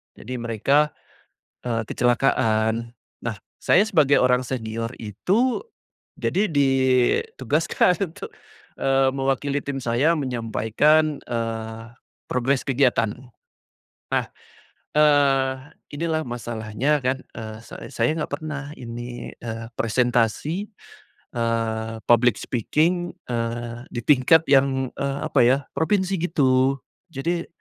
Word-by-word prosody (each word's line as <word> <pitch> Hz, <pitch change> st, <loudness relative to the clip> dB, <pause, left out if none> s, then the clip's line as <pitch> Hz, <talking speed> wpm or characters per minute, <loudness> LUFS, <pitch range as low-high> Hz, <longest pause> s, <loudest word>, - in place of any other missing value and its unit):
jadi 125 Hz, +2 st, -6 dB
mereka, 135 Hz, +6 st, +1 dB, 0.7 s
eee, 115 Hz, -2 st, 0 dB
kecelakaan. 115 Hz, -2 st, +1 dB, 0.3 s
Nah, 115 Hz, -2 st, -2 dB, 0.2 s
saya 185 Hz, -, +4 dB
sebagai 150 Hz, -9 st, +4 dB
orang 125 Hz, 0 st, +3 dB
senior 115 Hz, -2 st, -4 dB
itu 195 Hz, -, 0 dB, 0.6 s
jadi 205 Hz, +3 st, +1 dB
ditugaskan 140 Hz, -, +2 dB
untuk, -, -, -8 dB, 0.5 s
eee, 135 Hz, 0 st, +3 dB
mewakili 135 Hz, +1 st, -1 dB
tim 140 Hz, -1 st, -3 dB
saya 125 Hz, +7 st, +2 dB
menyampaikan, 135 Hz, +4 st, +1 dB
eee, 115 Hz, 0 st, -4 dB, 0.3 s
progres 125 Hz, +2 st, 0 dB
kegiatan. 125 Hz, -5 st, +2 dB, 1.0 s
Nah, -, -, +2 dB, 0.7 s
eee, 140 Hz, -3 st, +4 dB, 0.4 s
inilah 160 Hz, 0 st, 0 dB
masalahnya 120 Hz, +4 st, -1 dB
kan, 130 Hz, +1 st, 0 dB, 0.2 s
eee, 110 Hz, -1 st, -7 dB
say -, -, -9 dB
saya -, -, +2 dB
enggak 145 Hz, -, -3 dB
pernah 145 Hz, -2 st, -5 dB
ini, 120 Hz, 0 st, -7 dB
eee, 115 Hz, -1 st, -5 dB
presentasi, 125 Hz, -, 0 dB, 0.7 s
eee, 115 Hz, -1 st, -1 dB
public 120 Hz, -1 st, +4 dB
speaking, 170 Hz, -, 0 dB
eee, 120 Hz, +1 st, -3 dB
di 120 Hz, -, -3 dB
tingkat 150 Hz, +4 st, +5 dB
yang, 135 Hz, -1 st, +3 dB
eee, 140 Hz, 0 st, -1 dB
apa 145 Hz, -, +1 dB
ya, 130 Hz, +2 st, +5 dB, 0.2 s
provinsi 190 Hz, +2 st, +1 dB
gitu, 135 Hz, -5 st, +2 dB, 0.4 s
jadi 170 Hz, +4 st, -2 dB
130 Hz, 100 wpm, -23 LUFS, 115-150 Hz, 1.0 s, tingkat